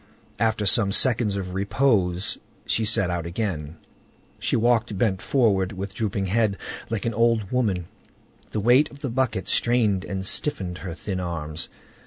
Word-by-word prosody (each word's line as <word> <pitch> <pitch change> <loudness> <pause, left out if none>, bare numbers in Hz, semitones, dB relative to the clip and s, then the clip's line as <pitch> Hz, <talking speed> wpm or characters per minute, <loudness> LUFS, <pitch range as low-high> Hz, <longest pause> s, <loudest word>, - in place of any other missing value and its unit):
After 110 -1 +1
some 100 0 +3
seconds 115 -2 +2
of 95 -2 -4
repose 100 -3 +1 0.3
she 110 - +1
set 100 -4 +2
out 85 -1 -2
again. 85 -5 -3 0.6
She - - 0
walked 115 -2 +2
bent 95 -3 +1
forward, 100 -8 +2
with 95 +1 -5
drooping 100 -2 -1
head, 105 +1 +1 0.3
like 115 -1 -2
an 115 - 0
old 115 -2 +2
woman; 105 -9 0 0.6
the 110 - -2
weight 125 +7 +5
of 140 - -14
the 135 -5 -3
bucket 120 -6 0
strained 110 -6 +2
and 95 -1 -4
stiffened 95 -6 0
her 90 -3 -6
thin 95 +1 -4
arms. 80 -3 -4
100 Hz, 155 wpm, -24 LUFS, 95-115 Hz, 0.6 s, weight